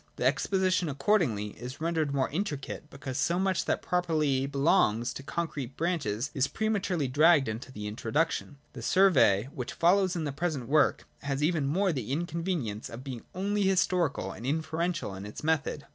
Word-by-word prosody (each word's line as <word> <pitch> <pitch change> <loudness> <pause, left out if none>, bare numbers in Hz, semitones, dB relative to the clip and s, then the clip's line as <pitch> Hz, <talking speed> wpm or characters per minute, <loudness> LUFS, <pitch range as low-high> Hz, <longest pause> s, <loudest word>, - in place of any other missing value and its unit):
The 125 - -2
exposition 185 +5 +2
accordingly 140 - +1
is 125 +3 -7
ren 165 +2 -1
dered 155 -3 0
more 135 -2 +1
intricate, 150 -4 -4
because 135 -1 -5
so 170 +5 +1
much 190 -1 +1
that - - -1
properly 155 -7 +1
belongs 135 - +2
to - - -7
the 140 - -18
concrete 145 -6 -3
branches 145 - -1
is 135 0 +1
prematurely 200 -8 -1
dragged 150 +1 +5
into 110 +4 -5
the 105 -4 -7
introduction. 140 +8 -1 0.2
The - - -8
survey 135 - +4
which 125 - -5
follows 185 +2 +3
in 165 - -2
the 145 - -2
present 145 -4 -2
work 150 0 +3 0.2
has 140 0 -2
even 155 -3 +1
more 185 +5 +1
the 130 -4 -4
inconvenience 165 - -2
of 115 +3 -8
being 130 -4 -7
only 200 +2 0
historical 180 - +1
and 110 - -10
inferential 160 - -1
in 95 +1 -7
its 105 +6 -8
method. 155 -2 0
150 Hz, 175 wpm, -29 LUFS, 130-175 Hz, 0.2 s, dragged